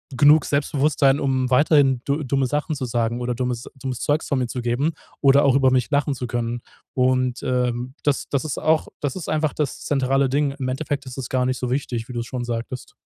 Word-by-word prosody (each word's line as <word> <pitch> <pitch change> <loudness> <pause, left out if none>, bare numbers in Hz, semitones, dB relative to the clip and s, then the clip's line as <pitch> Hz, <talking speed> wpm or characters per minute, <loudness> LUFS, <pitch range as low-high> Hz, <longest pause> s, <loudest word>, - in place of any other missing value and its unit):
genug 145 +3 +6
Selbstbewusstsein, 140 -1 +2
um 130 -2 0
weiterhin 135 -1 +4
du 145 +2 0
dumme 135 0 +1
Sachen 150 +3 -1
zu 135 -2 -3
sagen 115 0 -1
oder 125 0 -2
dummes 125 -1 -3
dummes 130 -2 -5
Zeugs 150 +2 0
von 140 - +1
mir 125 - -1
zu 125 +1 -4
geben 125 +7 0 0.3
oder 140 +1 +5
auch 135 -2 +4
über 135 -1 +4
mich 130 -2 +1
lachen 145 -1 +1
zu 125 -1 -4
können. 120 0 -2 0.3
Und, 130 -1 +1
ähm, 125 0 -1
das 145 -2 0
das 140 +1 -1
ist 150 - -3
auch 155 0 +2
das 145 +1 -2
ist 180 - -6
einfach 155 -1 +1
das 150 -4 -3
zentrale 135 -1 +1
Ding. 140 +1 +1
Im 130 -1 -2
Endeffekt 140 +1 -3
ist 130 0 -9
es 130 -3 -4
gar 130 -1 +1
nicht 130 0 0
so 125 - -2
wichtig, 125 -4 -2
wie - - -6
du's 120 -1 -4
schon 125 -2 -4
sagtest. 120 +1 -5
130 Hz, 220 wpm, -22 LUFS, 125-145 Hz, 0.3 s, genug